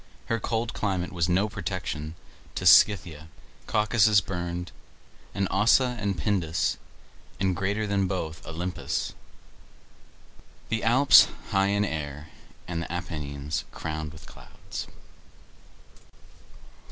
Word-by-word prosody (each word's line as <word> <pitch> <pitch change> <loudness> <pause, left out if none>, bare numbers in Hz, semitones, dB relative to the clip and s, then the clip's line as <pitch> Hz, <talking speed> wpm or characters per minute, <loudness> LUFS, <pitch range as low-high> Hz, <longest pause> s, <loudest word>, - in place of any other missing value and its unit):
Her 115 - +1
cold 115 +2 -2
climate 95 -3 -2
was 85 -1 0
no 95 +4 +3
protection 85 -6 -4 0.4
to - - -3
Scythia, 85 -6 +5 0.4
Caucasus 110 -1 +4
burned, 90 -2 -4 0.6
and 100 -1 0
Ossa 125 +5 +4
and 100 -3 -1
Pindus, 85 -2 0 0.6
and, 95 -1 +1
greater 100 +3 -1
than 100 -2 +1
both, 85 -4 -4
Olympus; 85 +2 -3 1.6
the 115 -1 -1
Alps 130 +5 +7 0.2
high 95 0 +3
in 100 +1 +1
air, 75 -3 -5 0.4
and 85 -2 -3
the 85 - -6
Apennines 75 -4 -4
crowned 80 -1 -5
with 80 +1 -13
clouds. - - -9
95 Hz, 105 wpm, -27 LUFS, 80-105 Hz, 1.6 s, Alps